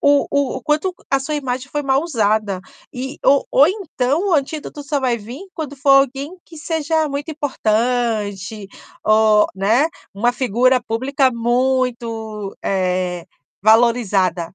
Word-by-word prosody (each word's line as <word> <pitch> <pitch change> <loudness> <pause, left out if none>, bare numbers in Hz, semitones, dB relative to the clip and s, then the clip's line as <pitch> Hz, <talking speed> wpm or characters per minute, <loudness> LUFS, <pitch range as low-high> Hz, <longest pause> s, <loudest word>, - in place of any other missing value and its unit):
o 285 0 +4
o 280 -2 0
o 260 - -7
quanto 310 +7 0 0.2
a 275 0 +2
sua 300 +3 -3
imagem 255 -2 -3
foi 295 0 -2
mal 270 +1 +2
usada 215 - 0 0.3
e 265 +2 -6
ou 280 0 +4
ou 280 - +6
então 340 - -1
o 345 - +4
antídoto 295 0 -3
só 290 0 -1
vai 250 -3 0
vim 245 - -9
quando 290 -4 -6
for 275 +1 +1
alguém 275 +4 +3
que 330 - -14
seja 315 0 -1
muito 285 +2 -4
importante, 220 -7 -1 0.4
ou, 215 -1 +5
né, 220 +10 +2 0.3
uma 240 +5 +1
figura 255 +1 +2
pública 260 +4 +1
muito, 235 -4 -1
eh, 180 -2 -1 0.4
valorizada. 205 -6 +2
255 Hz, 140 wpm, -19 LUFS, 220-285 Hz, 0.4 s, ou